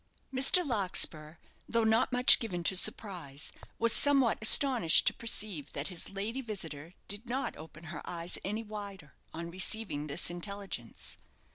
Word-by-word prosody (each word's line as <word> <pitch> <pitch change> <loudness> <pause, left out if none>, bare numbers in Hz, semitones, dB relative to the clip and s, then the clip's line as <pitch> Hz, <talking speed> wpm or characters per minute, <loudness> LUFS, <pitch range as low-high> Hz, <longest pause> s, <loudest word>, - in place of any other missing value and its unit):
Mr. 270 +7 +4
Larkspur, 180 - 0 0.3
though 230 -1 +1
not 220 +4 +2
much 250 0 +6
given 180 -7 -5
to 190 - +1
surprise, 175 -7 -2 0.3
was 230 0 +3
somewhat 275 -5 +3
astonished 230 - +5
to - - +4
perceive 210 -9 -3
that 140 +4 -3
his 180 -3 -5
lady 210 +7 -5
visitor 170 - -6
did 205 +5 -4
not 260 +3 -3
open 155 +1 -13
her 160 -1 -8
eyes 170 0 -5
any 210 +4 -4
wider 200 -7 -10 0.2
on 170 +1 -7
receiving 185 -4 0
this 155 +4 -1
intelligence. 190 - -7
195 Hz, 145 wpm, -30 LUFS, 165-230 Hz, 0.3 s, much